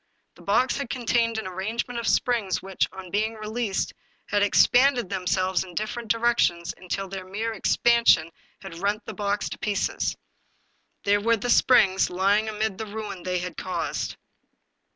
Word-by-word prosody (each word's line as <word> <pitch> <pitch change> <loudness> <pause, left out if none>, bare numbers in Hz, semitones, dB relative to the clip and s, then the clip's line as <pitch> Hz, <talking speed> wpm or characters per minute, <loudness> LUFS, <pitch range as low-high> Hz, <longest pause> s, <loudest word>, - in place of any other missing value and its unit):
The - - -18
box 245 +6 +2
had 280 -5 -4
contained 235 -2 0
an 220 - -3
arrangement 220 +6 -3
of 235 - -4
springs, 230 -6 +1
which, 195 -1 0
on 190 -2 -10
being 215 +2 0
released, 215 -1 -2 0.4
had 205 -1 +2
expanded 245 +2 +4
themselves 185 0 0
in 180 -2 -13
different 215 +3 -4
directions 230 -7 +1
until 190 +2 -4
their 190 0 -6
mere 215 +5 -3
expansion 225 -6 +3 0.3
had 170 -3 -8
rent 205 +3 -1
the - - -6
box 205 0 -1
to - - -8
pieces. 210 -4 -1 0.9
There 205 0 +2
were 230 +2 +3
the 245 +4 -1
springs, 195 -7 +4
lying 200 +4 +2
amid 215 -1 -2
the 220 - -4
ruin 205 -3 -6
they 180 0 -1
had 180 0 -5
caused. 185 - -3
205 Hz, 155 wpm, -25 LUFS, 190-230 Hz, 0.9 s, expanded